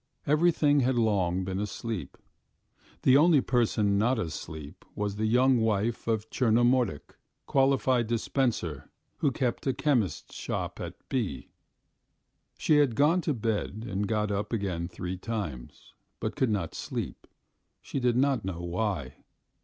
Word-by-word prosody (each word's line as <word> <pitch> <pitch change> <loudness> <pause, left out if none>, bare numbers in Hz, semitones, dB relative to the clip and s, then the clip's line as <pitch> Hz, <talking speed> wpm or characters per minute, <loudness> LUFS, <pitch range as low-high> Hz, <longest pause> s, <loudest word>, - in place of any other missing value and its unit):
Everything 150 -1 +3
had 130 -1 +2
long 95 -6 +1
been 95 +1 -3
asleep. 105 - -4 0.9
The 130 +1 +6
only 155 0 +6
person 110 -5 +2
not 120 +4 +2
asleep 80 -5 -6
was 105 -1 -2
the 110 +1 0
young 125 +2 +4
wife 110 +1 0
of 110 -1 0
Tchernomordik, 120 - +2
a - - -26 0.3
qualified 135 -3 +2
dispenser 115 - -1 0.3
who 145 - +2
kept 125 0 -2
a 130 - +1
chemist's 125 - 0
shop - - -4
at - - -6
B. 100 - -2 1.1
She 155 - +3
had 140 -6 +3
gone 155 +7 +4
to 155 -4 -1
bed 110 -1 -2
and 100 0 -2
got 105 0 0
up 100 +1 -2
again 95 -7 -2
three 90 0 -5
times, 90 - -6 0.3
but - - -3
could 130 - +1
not 95 -7 -1
sleep, - - -5 0.5
she - - -4
did 125 -2 +2
not 135 -3 +2
know 95 -2 -4
why. 90 -5 -2
110 Hz, 140 wpm, -28 LUFS, 95-130 Hz, 1.1 s, The